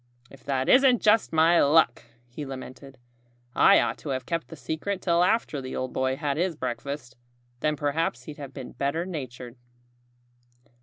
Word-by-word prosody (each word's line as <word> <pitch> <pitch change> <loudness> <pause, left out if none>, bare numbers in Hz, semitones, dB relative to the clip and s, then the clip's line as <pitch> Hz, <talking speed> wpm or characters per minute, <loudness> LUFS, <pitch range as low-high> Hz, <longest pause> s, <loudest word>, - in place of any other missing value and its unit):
"If 135 - -16
that 135 -2 -1
isn't 255 -2 +5
just 215 0 +3
my 165 +2 +4
luck!" 140 -6 +3 0.2
he 120 +5 -8
lamented. 135 0 -9 0.6
"I 200 - +6
ought - - -1
to 150 - -7
have 130 -2 -3
kept 165 -1 -3
the 165 - -10
secret 160 +8 -4
till 175 -1 +2
after 180 -8 0
the 130 0 -6
old 130 0 -4
boy 130 0 0
had 145 -1 -2
his 175 0 0
breakfast. 130 -1 -5 0.4
Then 150 +3 0
perhaps 145 -3 -1
he'd 150 +2 -9
have 140 -2 -8
been 130 -2 -8
better 140 +5 -2
natured." 130 -7 -7
145 Hz, 165 wpm, -26 LUFS, 130-165 Hz, 0.6 s, I